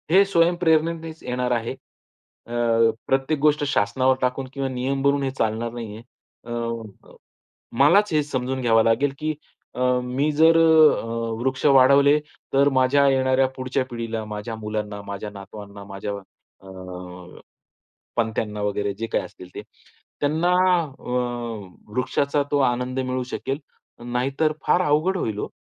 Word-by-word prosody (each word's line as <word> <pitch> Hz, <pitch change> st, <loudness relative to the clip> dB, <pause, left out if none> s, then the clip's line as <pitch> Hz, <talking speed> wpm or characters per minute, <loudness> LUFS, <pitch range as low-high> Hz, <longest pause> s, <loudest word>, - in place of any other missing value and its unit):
हे 190 Hz, +4 st, +6 dB
स्वयंप्रेरणेनेच 165 Hz, -3 st, +1 dB
येणार 125 Hz, 0 st, -2 dB
आहे. 115 Hz, -1 st, -1 dB, 0.8 s
अ, 115 Hz, -1 st, +2 dB, 0.2 s
प्रत्येक 135 Hz, +3 st, +1 dB
गोष्ट 150 Hz, 0 st, +3 dB
शासनावर 130 Hz, +2 st, +2 dB
टाकून 130 Hz, +1 st, -1 dB
किंवा 135 Hz, -1 st, -2 dB
नियम 130 Hz, +2 st, -2 dB
भरून 140 Hz, 0 st, +2 dB
हे 135 Hz, -, -1 dB
चालणार 115 Hz, +1 st, -1 dB
नाहीये. 110 Hz, -2 st, -7 dB, 0.4 s
अ, -, -, -8 dB, 1.3 s
मलाच 195 Hz, +8 st, +5 dB
हे 155 Hz, -1 st, +3 dB
समजून 130 Hz, -2 st, -3 dB
घ्यावं 115 Hz, -2 st, +3 dB
लागेल 120 Hz, +5 st, +2 dB
की 155 Hz, 0 st, -2 dB, 0.4 s
अ, -, -, 0 dB, 0.2 s
मी 135 Hz, +5 st, 0 dB
जर 160 Hz, +2 st, +5 dB
अ, 160 Hz, -6 st, +5 dB, 0.3 s
वृक्ष 130 Hz, +1 st, -2 dB
वाढवले 140 Hz, +1 st, +6 dB, 0.4 s
तर 140 Hz, +1 st, +5 dB
माझ्या 130 Hz, +2 st, +3 dB
येणाऱ्या 130 Hz, 0 st, +3 dB
पुढच्या 130 Hz, 0 st, -1 dB
पिढीला, 115 Hz, -2 st, -4 dB
माझ्या 105 Hz, +2 st, -6 dB
मुलांना, 105 Hz, -1 st, -4 dB
माझ्या 100 Hz, +1 st, -5 dB
नातवांना, 100 Hz, 0 st, -10 dB
माझ्या 100 Hz, +1 st, -6 dB, 0.5 s
अ, 90 Hz, -1 st, -10 dB, 0.8 s
पणत्यांना 110 Hz, -2 st, -1 dB
वगैरे 100 Hz, -1 st, -1 dB
जे 115 Hz, -, -2 dB
काही -, -, +1 dB
असतील 90 Hz, -, -12 dB
ते, -, -, -6 dB, 0.6 s
त्यांना 160 Hz, +5 st, +1 dB, 0.5 s
अ, 120 Hz, -6 st, -5 dB
वृक्षाचा 140 Hz, +3 st, 0 dB
तो 145 Hz, -, +3 dB
आनंद 125 Hz, +1 st, -3 dB
मिळू 130 Hz, 0 st, -2 dB
शकेल. 135 Hz, +1 st, -3 dB, 0.5 s
नाहीतर 135 Hz, +6 st, 0 dB
फार 180 Hz, -, +4 dB
अवघड 155 Hz, +6 st, +2 dB
होईल 110 Hz, -, -2 dB
हो. -, -, -3 dB
130 Hz, 135 wpm, -23 LUFS, 110-145 Hz, 1.3 s, हे